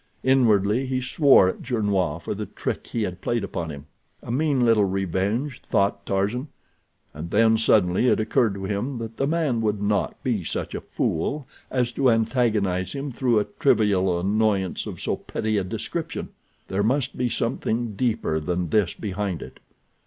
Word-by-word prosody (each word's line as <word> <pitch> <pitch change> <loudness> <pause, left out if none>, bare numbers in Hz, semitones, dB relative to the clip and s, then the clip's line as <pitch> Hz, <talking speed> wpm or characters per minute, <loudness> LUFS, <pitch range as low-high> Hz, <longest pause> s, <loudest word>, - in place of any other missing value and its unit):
Inwardly 120 -2 +3
he 130 0 0
swore 130 - +5
at 95 - -3
Gernois 100 - 0
for 85 - -4
the - - -5
trick - - -4
he 115 - -2
had 90 -3 -4
played 120 -3 -1
upon 85 -4 -4
him. 70 -1 -8 0.4
A - - -5
mean 135 -1 +2
little 110 -3 +4
revenge, 95 - -1
thought 100 0 0
Tarzan, 105 +8 0 0.7
and 80 +3 -7
then 110 +4 +4
suddenly 105 -1 +3
it - - +3
occurred 110 -1 +1
to 95 - -6
him 105 +7 -2
that 115 -1 -6
the 135 - +1
man 150 -7 +1
would 105 -2 0
not 100 0 0
be 120 -8 0
such - - -3
a - - -4
fool 140 - -2 0.2
as 125 -2 0
to 130 +1 +2
antagonize 110 -6 +1
him 140 0 -4
through 120 -2 +1
a 105 - +2
trivial 95 -8 +3
annoyance 100 0 0
of - - -7
so - - -1
petty 110 -1 -2
a - - -1
description. 115 - -4 0.4
There 95 +1 -1
must 130 +5 0
be 125 -1 0
something 115 -1 -1
deeper 110 -7 0
than 90 +2 -2
this 105 -2 +2
behind 100 -3 -3
it. - - -12
110 Hz, 170 wpm, -24 LUFS, 95-125 Hz, 0.7 s, swore